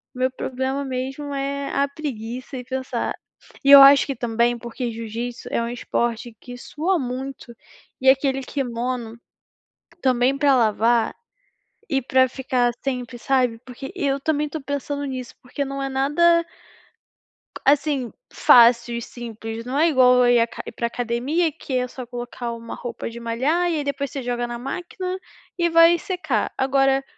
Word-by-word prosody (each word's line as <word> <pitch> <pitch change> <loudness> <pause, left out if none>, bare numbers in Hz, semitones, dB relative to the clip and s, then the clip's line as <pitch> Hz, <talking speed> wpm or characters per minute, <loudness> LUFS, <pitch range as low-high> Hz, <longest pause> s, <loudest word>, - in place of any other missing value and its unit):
Meu 255 +1 0
problema 265 +2 -3
mesmo 270 +2 -4
é 275 0 -3
a 280 0 +2
preguiça 255 -3 -6
e 250 - -6
pensar 260 +1 -3 0.5
e 280 - +6
eu 280 -1 +12
acho 275 +1 +8
que 275 - -3
também 235 0 0
porque 235 +1 -5
jiu-jitsu 230 +2 -6
é - - 0
um 230 - -2
esporte 235 -1 -2
que 245 0 -10
sua 330 +9 -1
muito, 255 0 -6 0.5
e 265 - +5
aquele 270 0 +2
kimono, 245 -3 -4 0.8
também 255 +1 +2
para 280 0 +4
lavar, 225 0 +2 0.8
e 270 -1 +1
para 260 +1 +3
ficar 250 -2 0
sempre 250 -2 -3
sabe. 250 -3 +1
Porque 255 +1 -8
eu 280 -6 0
também 300 0 0
estou 310 +1 -6
pensando 285 +1 -3
nisso 255 -3 -6
porque 280 +3 -4
não 275 0 -4
é 270 - -2
nada 325 +6 +3 1.2
assim, 280 -3 +2 0.2
fácil 235 0 +5
e - - -4
simples, 225 -1 -7
não 255 +3 -3
é 330 - +5
igual 255 -4 +5
eu - - +4
ir 240 - +5
à 230 - +3 0.3
pra 235 - -1
academia 250 +8 -1
que 280 -3 -4
é 250 0 0
só 255 0 -8
colocar 240 0 -6
uma 230 0 -8
roupa 240 -2 -6
de 235 +1 -9
malhar 265 +10 0
e 325 - 0
aí 295 - -2
depois 280 -1 -3
você 275 - -4
joga 240 0 -2
na 240 0 -5
máquina 360 +8 -5 0.4
e 345 -1 +2
vai 330 +1 +6
secar, 365 +1 -2
agora 270 0 +2
260 Hz, 160 wpm, -22 LUFS, 240-280 Hz, 1.2 s, eu